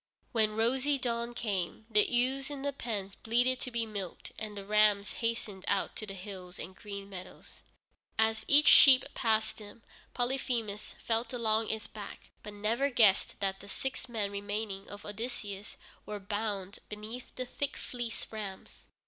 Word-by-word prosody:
When 215 -3 +2
rosy 260 +6 +3
dawn 235 -2 -2
came, 200 -2 -2
the 210 -3 +4
ewes 260 +3 +2
in 280 -2 -5
the 285 0 0
pens 205 -7 -3
bleated 245 +4 +2
to - - -2
be 235 -2 0
milked 200 -5 -5
and 210 -1 -5
the 200 - -6
rams 210 -1 +4
hastened 230 -5 -2
out 200 -1 +1
to 215 - -4
the 195 - -5
hills 185 -2 -8
and 185 +2 -7
green 200 -1 -7
meadows. 185 -2 -10 0.6
As 220 0 +3
each 295 +1 +7
sheep 260 -2 +9
passed 220 -2 +1
him, 210 +2 -12 0.3
Polyphemus 245 -4 -1
felt 230 +2 0
along 220 -2 +1
its 220 -1 -2
back, 205 -2 -9
but 210 - -7
never 230 +7 +1
guessed 215 -7 +4
that 195 -1 0
the 200 - -11
six 255 +3 -4
remaining 205 -1 -2
men - - -16
of 205 0 -9
Odysseus 210 -2 -5 0.3
were 210 -1 -4
bound 205 -1 -3
beneath 215 +4 -7
the 255 - -2
thick 280 +3 -3
fleeced 240 -2 -5
rams. 205 -3 -7
220 Hz, 160 wpm, -32 LUFS, 200-240 Hz, 0.6 s, sheep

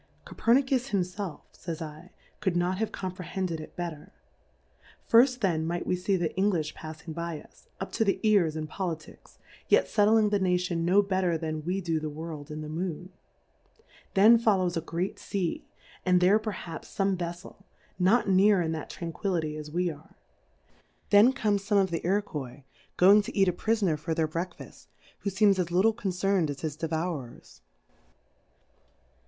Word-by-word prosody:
Co^er/iicus 260 +2 +1
himfelf, 185 -3 -3
fays 165 -2 -6
J, 160 +2 -9 0.3
could 190 -4 0
not 180 +2 0
have 220 - -1
comprehended 185 -2 -4
it - - -11
better: 170 -4 -6 1.0
Firft 250 +2 +5
then 170 -6 +1
might 175 +1 -2
we - - +1
fee 185 +2 0
the 175 -3 0
Englijh 180 -6 0
paf 155 -1 -9
fing 160 - -7
by 170 -1 -4
us, - - -20
up - - -5
to 225 - +1
the 195 -2 +1
Ears 195 -8 +3
in 155 -1 -3
Poli 175 +1 -3
ticks, 155 - -18 0.3
yet - - +4
fetling 215 0 +4
the 205 - +2
Nation 180 -2 0
no 195 +4 +4
better 185 -3 0
than 155 -1 -4
we 185 +3 -1
do 165 -3 -1
the 155 0 -4
World 155 -1 -7
m 155 0 -5
the 155 - -6
Moo?t; 175 +2 -4 1.0
then 220 +4 +7
follows 190 -6 +2
a 165 - -1
great 170 +4 -3
Sea, 185 -4 -3 0.4
and 180 -1 +4
there 190 +4 +5
perhaps 195 -6 -7
fome 195 -1 +2
Veffel, 175 +2 -7 0.4
not 200 +7 +3
near 195 +1 +5
in 165 -2 0
that 160 -2 -5
Tranqui 170 -1 -6 0.2
lity 160 -4 -1
as 150 -1 -7
we 175 +2 0
are; 150 0 -15 1.0
then 210 +5 +7
come 215 -6 +1
fome 200 +1 +1
of 190 -2 +1
the 165 - -2
Iro^ 200 +4 +1
quois 135 -5 -7 0.3
going 200 +4 +7
to 205 - -8
eat 195 -1 +4
a 180 - +2
Prifoner 195 -5 0
for 160 +1 -3
their 160 -1 +1
Breakfaft, 170 +3 -7 0.3
who 200 - -2
feems 195 0 +3
as 175 -2 0
little 190 +6 +3
concerned 195 -5 0
as 140 -1 -5
his 155 -3 -3
Devourers. 160 -5 -5
180 Hz, 170 wpm, -28 LUFS, 160-200 Hz, 1.0 s, then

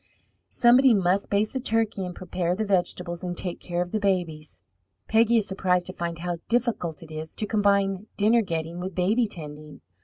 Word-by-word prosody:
Somebody 250 0 +5
must 190 0 +1
baste 205 +1 +1
the 265 - -1
turkey 225 -5 0
and 180 - -7
prepare 180 -1 -2
the 215 +3 -1
vegetables 180 -3 -1
and 175 -1 -4
take 180 -2 -3
care 175 0 -2
of 175 - -11
the 215 - 0
babies. 175 -6 -2 0.4
Peggy 230 +1 +4
is 215 - +1
surprised 180 -2 +1
to 185 - -7
find 170 -1 -4
how 175 +1 -3
difficult 230 -10 -1
it 160 - -13
is 155 0 -7
to 215 - -2
combine 200 -1 +1
dinner 220 +3 +4
getting 165 -3 -4
with 185 0 -5
baby 215 +6 +2
tending. 150 -5 -9
185 Hz, 185 wpm, -26 LUFS, 175-215 Hz, 0.4 s, Somebody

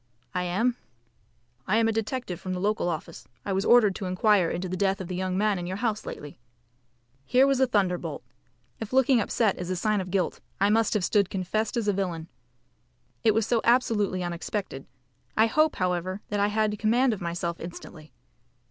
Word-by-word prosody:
"I 180 0 -1
am." 225 +8 0 0.9
"I 210 - +3
am 225 0 +3
a - - +2
detective 225 -4 -3
from 185 - -4
the 180 - -3
local 205 -2 0
office. 165 0 -6 0.2
I 200 - -1
was 190 +1 0
ordered 235 -5 +6
to 195 - -5
inquire 185 -1 +3
into 185 +2 -3
the 185 - -3
death 195 0 +1
of 185 - -5
the 180 - -4
young 185 0 -2
man 205 -2 +1
in 175 - -5
your 185 +1 -3
house 220 -2 -2
lately." 145 -3 -8 0.8
Here 255 - +4
was 275 -1 +2
a 265 - +4
thunderbolt! 180 - -1 0.6
If 225 +2 -6
looking 260 -2 +4
upset 210 -1 +1
is 180 0 -4
a 185 - 0
sign 210 +2 +1
of 185 - -7
guilt, 180 -2 -1 0.2
I 200 +2 +3
must 225 0 +2
have 195 -4 +1
stood 200 -3 +2
confessed 215 +6 -2
as 225 -3 -1
a 205 - +3
villain. 175 -4 -3 0.9
It 220 -2 +4
was 225 -1 +2
so 230 0 +1
absolutely 220 -6 +2
unexpected. 175 -3 -4 0.5
I 220 - +6
hope, 310 +7 +2
however, 185 +1 -1
that 205 - -1
I 200 - +3
had 210 0 0
command 240 +3 +3
of 210 - -6
myself 170 0 -3
instantly. 165 -3 -10
200 Hz, 195 wpm, -27 LUFS, 180-225 Hz, 0.9 s, ordered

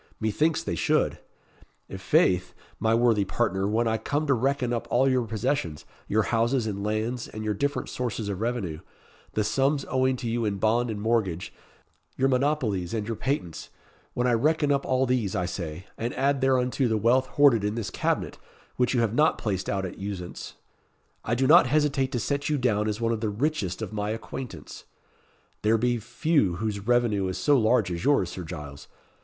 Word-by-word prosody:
Methinks 150 +10 +1
they - - -3
should. - - +1 0.7
I' - - -7
faith, 90 -1 +2 0.2
my 110 0 +2
worthy 115 -3 +3
partner, 95 -1 0
when 115 +3 +1
I 110 0 0
come 145 +7 -1
to 140 - +3
reckon 130 0 0
up 115 - -3
all 130 +2 +3
your 130 -3 +1
possessions, 110 - -2 0.2
your 110 +2 +2
houses 115 +2 +1
and 100 -2 -3
lands, 110 +3 -2
and 110 0 -7
your 105 - 0
different 140 +8 -2
sources 120 -4 -3
of 100 -1 -4
revenue 110 -10 -2 0.5
the 105 - +1
sums 135 +7 +1
owing 130 0 +1
to 125 -1 -5
you 115 +1 -1
in 105 -2 -1
bond 115 +4 +1
and 105 -2 -4
mortgage 105 -6 -1 0.6
your 135 +1 +2
monopolies 125 - 0
and 105 -2 -2
your 115 +1 -3
patents 120 - -3 0.5
when 125 - 0
I 125 - +3
reckon 150 +5 +2
up 140 -1 0
all 130 0 +2
these, 120 -6 0
I 90 - 0
say, 85 -1 -5
and 115 +2 -3
add 140 0 +1
thereunto 130 0 +2
the 110 -1 +1
wealth 125 +5 +3
hoarded 135 -7 +5
in 105 +1 -1
this 115 -3 -4
cabinet, - - -2 0.4
which 125 +1 +1
you 120 - +3
have 115 -2 0
not 150 +5 +3
placed 95 -4 -2
out 95 -1 -1
at 90 - -7
usance 95 -3 -6 0.7
I 120 - 0
do 130 +2 +1
not 130 -2 +7
hesitate 140 -1 +1
to 120 - 0
set 140 +6 -1
you 150 - +1
down 110 -5 +1
as 105 +1 -2
one 115 0 0
of 110 -2 -2
the 110 - 0
richest 110 - -2
of 110 - -6
my 105 0 -2
acquaintance. 115 +3 -7 0.8
There 110 +2 +3
be 120 +1 +1
few 115 - +1
whose 105 +1 -2
revenue 120 -6 +2
is 95 - -3
so 145 - +3
large 110 -5 +3
as 85 -1 -4
yours, 140 -12 +2
Sir 95 - -6
Giles. 75 -4 -8
115 Hz, 195 wpm, -26 LUFS, 105-130 Hz, 0.8 s, not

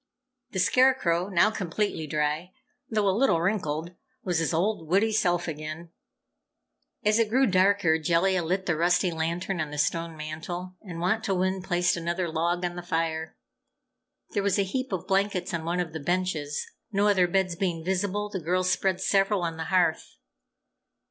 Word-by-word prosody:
The - - -6
Scarecrow, 185 -4 +3
now 200 +3 +4
completely 190 -4 -2
dry 150 +4 -1 0.4
though 215 -2 +1
a 190 - +3
little 230 -7 +3
wrinkled, 170 -3 -1 0.3
was 175 -3 0
his 165 - 0
old, 170 0 0
witty 200 +6 +3
self 175 -5 +1
again. 155 +2 -6 1.1
As 210 +2 +4
it 225 -2 +2
grew 260 +4 +4
darker, 185 -5 +3
Jellia 175 +3 +2
lit 185 +3 -1
the 175 - +1
rusty 175 +2 +2
lantern 170 +3 -2
on 155 - -3
the 150 - -7
stone 165 +2 -1
mantel, 175 +4 -6
and 175 -5 -8
Wantowin 190 -1 0
placed 180 -1 +1
another 170 +1 -2
log 170 +2 0
on 175 0 -3
the 175 - -5
fire. 165 -2 -2 0.9
There 205 - 0
was 200 0 +1
a 200 - +3
heap 255 +6 -3
of 185 -4 -3
blankets 195 -2 0
on 165 -1 -3
one 175 +2 -1
of 170 -3 -3
the 160 - -4
benches. 160 -3 -1 0.3
No 200 0 +2
other 190 -3 +4
beds 185 -1 0
being 170 -3 -2
visible, 200 +2 -1
the 205 -2 -4
girls 180 +3 +1
spread 190 -1 0
several 195 -1 +2
on 165 -1 -3
the 160 - -4
hearth. 175 -2 +1
180 Hz, 170 wpm, -27 LUFS, 165-195 Hz, 1.1 s, now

